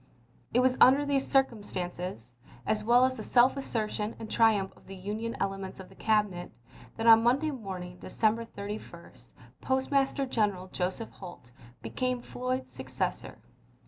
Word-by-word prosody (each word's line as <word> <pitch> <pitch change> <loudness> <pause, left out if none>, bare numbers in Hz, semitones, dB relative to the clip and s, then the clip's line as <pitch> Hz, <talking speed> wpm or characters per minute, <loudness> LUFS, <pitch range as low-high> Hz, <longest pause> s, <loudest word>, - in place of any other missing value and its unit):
It 250 - +3
was 255 0 +2
under 275 +3 +7
these 275 -1 0
circumstances 180 - -1 0.3
as 210 +5 0
well 240 +3 +5
as 260 0 -1
the - - -5
self 245 +4 +4
assertion 220 -5 -3
and 220 - -8
triumph 215 -4 +3
of - - -22
the 195 - -8
Union 210 +5 -4
elements 195 -1 -3
of 190 - -10
the 190 - -17
Cabinet 210 -5 0 0.5
that 225 - -2
on 225 -1 +8
Monday 270 +7 +2
morning, 185 -8 -7
December 225 +1 0
31, 210 -1 -8 0.5
Postmaster 270 +1 +1
General 205 -7 -1
Joseph 185 +6 -3
Holt 175 -10 -11 0.3
became 245 - -2
Floyd's 255 +1 -3
successor. - - -4
220 Hz, 145 wpm, -29 LUFS, 195-255 Hz, 0.5 s, on